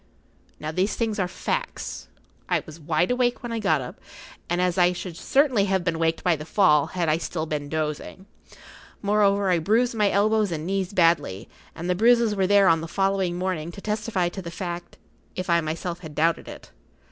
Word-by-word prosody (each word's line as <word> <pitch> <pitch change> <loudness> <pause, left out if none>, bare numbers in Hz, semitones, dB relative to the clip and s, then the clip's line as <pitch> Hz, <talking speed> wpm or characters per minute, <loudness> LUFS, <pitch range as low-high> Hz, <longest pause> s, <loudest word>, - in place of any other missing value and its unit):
Now 155 - -4
these 185 +6 0
things 220 -3 -1
are 185 - +1
facts. - - -4 0.4
I - - +1
was 155 +1 -11
wide 160 +5 0
awake 250 -1 0
when 240 - -5
I 230 - -2
got 160 -9 +2
up, 125 - -8 0.5
and 175 +1 0
I 180 0 +3
should 175 -1 -6
certainly 260 - +2
have 190 -2 0
been 165 -2 -1
waked 165 0 0
by 175 -2 +3
the 150 - -7
fall 155 -3 +3
had 175 -2 -2
I 155 +1 +2
still 160 -1 -3
been 150 -2 -4
dozing. 155 +4 -4 0.8
Moreover, 200 -1 +3
I 175 - +3
bruised 225 +9 +2
my 210 -3 +2
elbows 210 0 +2
and 155 -1 -3
knees 190 0 -1
badly, 165 - +2 0.3
and 170 +1 -5
the 180 - +2
bruises 230 +2 +4
were 190 -2 +1
there 200 0 +5
on 165 -1 +4
the 165 - -5
following 195 -1 0
morning 180 -3 -2
to - - -9
testify 210 -3 -1
to 190 +2 -7
the 170 - -7
fact, 175 0 -6 0.4
if 185 - -3
I[Pg 170 - +5
42] 165 - -4
myself 170 +3 -4
had 155 -4 -10
doubted 165 +2 +1
it. - - -11
180 Hz, 200 wpm, -24 LUFS, 165-200 Hz, 0.8 s, there